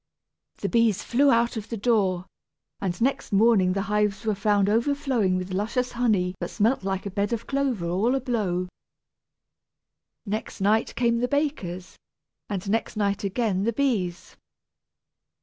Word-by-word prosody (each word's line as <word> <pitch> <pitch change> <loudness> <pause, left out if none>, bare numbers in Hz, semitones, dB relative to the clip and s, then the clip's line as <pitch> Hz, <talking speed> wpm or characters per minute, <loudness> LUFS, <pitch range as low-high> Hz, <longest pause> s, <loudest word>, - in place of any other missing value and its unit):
The - - -2
bees 230 -4 +2
flew 275 +4 +3
out 235 -2 +2
of 220 0 -6
the 230 - -3
door, 195 -5 +1 0.6
and 180 -3 -2
next 270 -1 0
morning 200 -3 +4
the 195 0 -1
hives 210 +1 0
were 215 - +2
found 200 0 +2
overflowing 235 -4 +1
with 185 +1 -4
luscious 225 +6 -1
honey 210 -7 +1
that - - -3
smelt 225 +2 +1
like 195 0 -2
a 200 - -4
bed 200 +2 -1
of 230 0 -3
clover 270 -9 -1
all 205 +9 +1
a - - +1
blow. 205 -8 -1 1.6
Next 215 +2 -4
night 210 +3 +1
came 235 -1 +2
the 245 - +1
bakers, 250 - -2 0.5
and 195 -2 -4
next 220 +2 -1
night 200 -1 0
again 200 -1 0
the 230 +3 0
bees. 215 -10 -1
210 Hz, 150 wpm, -25 LUFS, 195-235 Hz, 1.6 s, morning